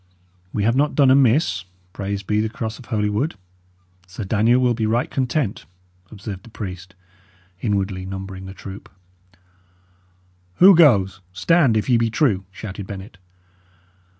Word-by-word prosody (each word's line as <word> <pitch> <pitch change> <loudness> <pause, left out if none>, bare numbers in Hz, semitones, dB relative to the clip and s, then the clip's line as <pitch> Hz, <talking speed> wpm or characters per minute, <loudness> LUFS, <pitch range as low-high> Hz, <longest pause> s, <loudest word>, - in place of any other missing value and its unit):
"We 105 - -1
have 115 +3 +2
not 145 +2 +1
done 135 -3 +5
amiss, 130 - +3 0.3
praised 100 0 -4
be 105 +2 +1
the 110 - -1
cross 110 0 -5
of 130 - -13
Holywood! 105 +7 -1 0.7
Sir 90 +4 -7
Daniel 110 +5 +3
will 125 -1 +2
be 110 -1 -1
right 120 +3 +1
well - - -21
content," 130 -2 -1 0.4
observed 100 -2 -8
the 115 - -15
priest, 95 -4 -8 0.7
inwardly 95 -3 -1
numbering 95 0 -7
the 95 - -9
troop. 95 +2 -10 1.7
"Who 190 +1 +8
goes? 100 - +4
Stand! 140 - +3
if 105 - -1
ye 125 -2 +4
be 115 0 +1
true!" 110 - +1
shouted 100 0 -7
Bennet. 95 0 -9
110 Hz, 145 wpm, -21 LUFS, 95-125 Hz, 1.7 s, Who